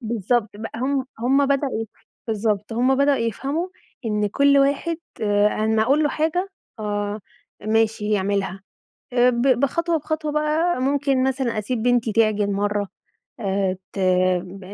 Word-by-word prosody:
بالضبط 230 -1 0
بقى، 225 +1 -6
هُم 265 +2 0
هُم 270 +4 +3
بدأوا 275 -4 0
يف 225 - -8 0.4
بالضبط 215 -1 -1
هُم 250 +4 +2
بدأوا 280 0 +3
يفهموا 275 - -2 0.4
إن 210 -1 0
كل 280 +5 +4
واحد، 280 +4 +1 0.3
آآ، 205 -1 +3 0.2
أمّا 220 0 +2
أقول 275 +6 +3
له 295 - +2
حاجة، 325 +6 -1 0.3
آه 205 0 -3 0.5
ماشي 220 -1 +1
يعملها. 195 -2 0 0.5
آآ، 245 0 +5
ب 235 -1 -1 0.2
بخطوة 335 +5 +1
بخطوة 310 0 -3
بقى، 305 0 +1
ممكن 275 -1 +1
مثلًا 260 -4 0
أسيب 220 +2 -3
بنتي 245 -2 +2
تعجن 210 -2 +2
مرّة، 205 0 -1 0.5
آآ، 195 -3 -1 0.2
ت - - -5 0.4
ب 185 +2 -10
235 Hz, 145 wpm, -22 LUFS, 210-280 Hz, 0.5 s, آآ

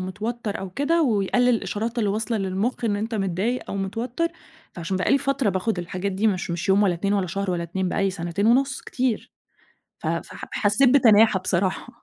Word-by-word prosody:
متوتر 210 +4 -4
أو 190 -1 -6
كده 320 - +1
ويقلل 245 0 +2
الإشارات 230 0 -1
اللي 210 -3 +1
واصلة 220 +2 -1
للمخ 195 +6 -2
إن 205 -2 +1
أنت 220 +2 -3
متضايق 195 +5 -1
أو 200 - -3
متوتر، 235 - -2 0.4
فعشان 175 +2 -3
بقى 185 - 0
لي 275 - +5
فترة 275 -5 0
باخد 190 +1 -1
الحاجات 185 +3 -3
دي، 205 +4 0
مش 190 -3 0
مش 170 +2 -3
يوم 195 +2 +5
ولا 185 -3 +3
2 200 +4 -1
ولا 195 -2 +1
شهر 195 +2 -2
ولا 175 -1 -1
2 185 +2 -2
بقى 195 - -1
لي 195 - +2
سنتين 180 +3 -2
ونُص 260 +3 +3
كتير، 250 -4 -2 0.7
ف - - -5
ف - - -2 0.2
حسيت 210 +5 +3
بتناحة 220 -6 +5
بصراحة. 185 +4 -1
205 Hz, 195 wpm, -24 LUFS, 190-235 Hz, 0.7 s, لي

